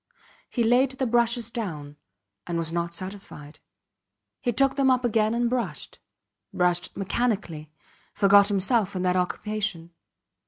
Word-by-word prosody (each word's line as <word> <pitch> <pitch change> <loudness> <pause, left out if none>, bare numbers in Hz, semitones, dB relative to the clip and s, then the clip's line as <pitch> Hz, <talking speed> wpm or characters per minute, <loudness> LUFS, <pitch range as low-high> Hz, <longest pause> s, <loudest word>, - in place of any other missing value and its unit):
He 240 - 0
laid 245 +4 +4
the 265 0 -2
brushes 235 -1 +1
down, 160 - -5 0.5
and 170 - -2
was 165 -1 -2
not 170 0 -2
satisfied. 185 -5 -9 0.8
He 240 - -1
took 270 +3 +2
them 275 -1 +3
up 255 -1 +2
again 220 -1 +1
and 240 0 +1
brushed, 230 - -4 0.5
brushed 175 -2 0
mechanically 195 -7 -2 0.5
forgot 200 0 +6
himself 200 0 +1
in 185 - -2
that 180 0 +1
occupation. 185 -1 -2
205 Hz, 130 wpm, -25 LUFS, 175-235 Hz, 0.8 s, forgot